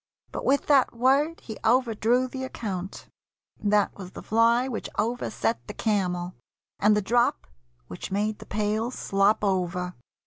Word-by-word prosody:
But - - -5
with 280 +1 +2
that 275 -5 +3
word 275 +7 +2
He 220 - -8
overdrew 240 +1 +2
the 260 +1 -6
account. 195 -7 -5 0.6
That 205 0 +2
was 190 -3 -9
the - - -9
fly 230 +3 +3
Which 245 -4 -4
overset 230 0 -1
the 210 - -7
camel, 180 -4 -1 0.5
and 210 +1 +4
the 210 - 0
drop 240 +4 +2 0.4
Which 90 - -7
made 210 +2 -1
the - - -11
pail 215 +2 -1
slop 200 -3 +1
over. 180 -2 -1
215 Hz, 145 wpm, -26 LUFS, 195-245 Hz, 0.6 s, and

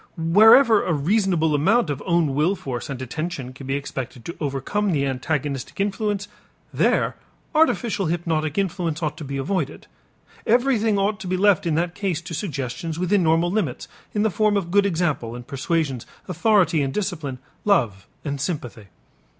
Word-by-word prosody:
Wherever 215 +8 +6
a 175 - 0
reasonable 170 0 +1
amount 185 +5 +3
of 140 - -4
own 170 -5 +2
will 155 +8 +2
force 130 -8 -5
and 135 -2 -5
attention 150 -3 -5
can 130 0 -10
be 135 - 0
expected 130 -3 -6
to 170 - -6
overcome 150 +9 -1
the 140 -2 +1
antagonistic 135 +1 -3
influence, 200 0 -1 0.5
there - - +1 0.4
artificial 240 - +2
hypnotic 160 -2 -1
influence 175 -4 -1
ought 150 -1 -1
to - - -7
be 140 -1 -4
avoided. 150 0 -2 0.6
Everything 230 -3 +3
ought 200 +1 0
to 190 - -7
be 185 +1 0
left 195 -3 +3
in 160 - +1
that 170 +2 0
case 190 -6 -2
to 175 0 -8
suggestions 155 - -4
within 185 +3 +2
normal 165 +1 +2
limits, 190 - -2 0.2
in 210 - 0
the 220 - +2
form 215 +1 +2
of 175 -3 -3
good 200 +1 +4
example 160 -10 -1
and 120 0 -8
persuasions, 135 -2 -2 0.2
authority 180 -3 +3
and 135 -1 -2
discipline, 160 -10 -3 0.3
love 115 - +1 0.2
and 140 -2 -3
sympathy. 125 - -4
165 Hz, 165 wpm, -23 LUFS, 140-200 Hz, 0.6 s, Wherever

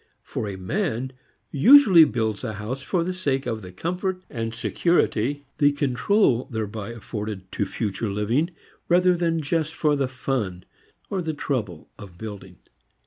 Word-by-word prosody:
For 105 - -4
a 100 - -5
man 130 - -2 0.4
usually 195 - +8
builds 110 -6 -2
a 110 -3 -3
house 110 +6 -5
for 170 +5 0
the 185 +2 -2
sake 140 -7 -1
of 115 -3 -3
the 90 -2 -9
comfort 180 - -3
and 115 -3 -3
security, 145 0 0
the 145 -1 +5
"control," 140 - +2
thereby 110 -2 -4
afforded 105 -4 -6
to - - -1
future 110 0 -3
living 110 - 0 0.4
rather 180 +1 +5
than 165 -2 0
just 155 +1 -1
for 150 -2 +2
the 140 -2 0
fun 125 -8 -3 0.5
or 190 - 0
the 160 -2 -3
trouble 110 - -3
of 95 -5 -11
building. 100 -4 -8
130 Hz, 150 wpm, -24 LUFS, 110-165 Hz, 0.5 s, usually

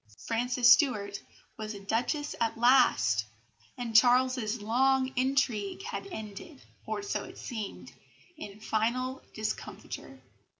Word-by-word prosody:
Frances 245 +1 +1
Stuart 210 -7 +3 0.4
was 215 -1 -5
a - - -8
Duchess 240 +9 -1
at 225 -1 0
last; 125 - +4 0.5
and 235 -2 -5
Charles's 245 -1 +4
long 260 +4 +2
intrigue 255 - 0
had 445 -2 -5
ended 220 - -8 0.3
(or 405 - -3
so 405 - -2
it - - -11
seemed) 220 -5 -6 0.4
in 210 -8 -9
final 250 +5 -1
discomfiture. 215 0 -6
240 Hz, 115 wpm, -30 LUFS, 215-260 Hz, 0.5 s, last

